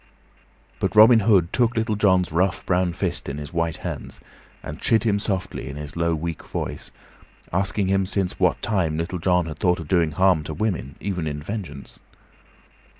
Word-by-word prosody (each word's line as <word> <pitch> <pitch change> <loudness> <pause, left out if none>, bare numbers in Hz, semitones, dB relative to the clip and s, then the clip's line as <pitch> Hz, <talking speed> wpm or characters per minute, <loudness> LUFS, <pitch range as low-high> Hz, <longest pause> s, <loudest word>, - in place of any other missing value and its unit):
But - - -1
Robin 110 +2 +8
Hood 100 -5 +3
took 120 -1 +2
Little 110 -1 0
John's 95 -4 +2
rough, 90 +4 0
brown 90 -1 +1
fist - - -2
in 70 - -5
his 75 +1 -7
white 85 -1 -1
hands, - - -5 0.4
and 75 +2 -7
chid 115 -1 +3
him 105 -3 +1
softly 95 -9 -3
in 70 - -7
his 75 0 -7
low, 85 -1 +1
weak 80 0 -4
voice, - - -5 0.6
asking 100 +1 +1
him 95 0 +1
since 95 -2 -2
what - - +2
time 90 -7 0
Little 85 +2 -3
John 90 0 +2
had 80 -2 -7
thought 90 0 +2
of 80 - -7
doing 85 -3 +2
harm 90 -1 +3
to 80 - -5
women, 85 - -2
even 90 -5 -3
in 75 -1 -3
vengeance. 80 -4 -7
90 Hz, 180 wpm, -23 LUFS, 80-100 Hz, 0.6 s, Robin